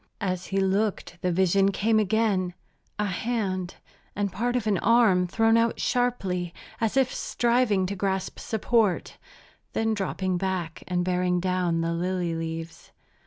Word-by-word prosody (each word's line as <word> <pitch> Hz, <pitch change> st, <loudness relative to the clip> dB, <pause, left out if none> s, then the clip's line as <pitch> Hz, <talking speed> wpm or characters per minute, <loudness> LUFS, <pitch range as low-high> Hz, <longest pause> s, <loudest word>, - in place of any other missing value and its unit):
As 185 Hz, -3 st, -2 dB
he 195 Hz, -, 0 dB
looked 195 Hz, -2 st, 0 dB
the 180 Hz, -, +1 dB
vision 190 Hz, +2 st, +3 dB
came 220 Hz, +3 st, +2 dB
again, 200 Hz, -4 st, +1 dB, 0.4 s
a 210 Hz, -, 0 dB
hand, 190 Hz, -3 st, -2 dB, 0.4 s
and 200 Hz, -1 st, -1 dB
part 240 Hz, +6 st, -1 dB
of 245 Hz, -3 st, 0 dB
an 205 Hz, -4 st, +1 dB
arm, 220 Hz, -6 st, +4 dB
thrown 225 Hz, +4 st, +3 dB
out 230 Hz, 0 st, +1 dB
sharply 195 Hz, -9 st, -1 dB, 0.2 s
as 225 Hz, +3 st, 0 dB
if 265 Hz, -2 st, +3 dB
striving 235 Hz, -5 st, +1 dB
to 200 Hz, +2 st, -3 dB
grasp 190 Hz, -1 st, -2 dB
support, 220 Hz, -3 st, 0 dB, 0.5 s
then 225 Hz, 0 st, +1 dB
dropping 190 Hz, -2 st, -1 dB
back 185 Hz, -4 st, -3 dB
and 180 Hz, 0 st, 0 dB
bearing 180 Hz, 0 st, +1 dB
down 180 Hz, -2 st, 0 dB
the 165 Hz, 0 st, -1 dB
lily 175 Hz, 0 st, -1 dB
leaves. 165 Hz, 0 st, -6 dB
190 Hz, 145 wpm, -26 LUFS, 180-220 Hz, 0.5 s, arm